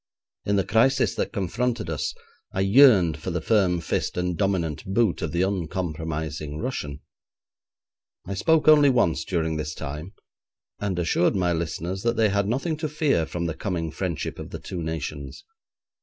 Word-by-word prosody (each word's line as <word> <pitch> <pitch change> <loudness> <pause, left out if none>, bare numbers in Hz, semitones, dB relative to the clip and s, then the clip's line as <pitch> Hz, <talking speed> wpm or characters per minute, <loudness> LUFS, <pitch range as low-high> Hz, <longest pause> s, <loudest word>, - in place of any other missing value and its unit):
In 100 - +1
the 100 - +2
crisis 130 +5 +3
that - - -2
confronted 115 +3 -1
us, 80 -3 -2 0.4
I 95 - -1
yearned 95 - +6
for 95 - -5
the 90 0 -1
firm 90 -1 +2
fist 85 - -2
and 90 0 0
dominant 85 -6 -1
boot 100 0 +1
of - - -2
the 85 +2 +1
uncompromising 80 -5 -3
Russian. 75 - -4 1.2
I 100 - -4
spoke 155 - +2
only 150 -2 +7
once 90 -11 +2
during 80 -3 -1
this 75 0 -4
time, 75 +6 -6 0.7
and 100 -3 -2
assured 90 +2 +2
my 90 -2 +1
listeners 85 +3 -3
that 115 +2 +1
they 110 -2 +3
had 100 0 +1
nothing 140 +8 -1
to 155 0 -3
fear 145 - +1
from 85 0 -3
the 85 - -1
coming 85 -3 -3
friendship 85 -4 -4
of - - -7
the - - -6
two 90 -2 -6
nations. 80 -3 -5
90 Hz, 165 wpm, -25 LUFS, 80-110 Hz, 1.2 s, only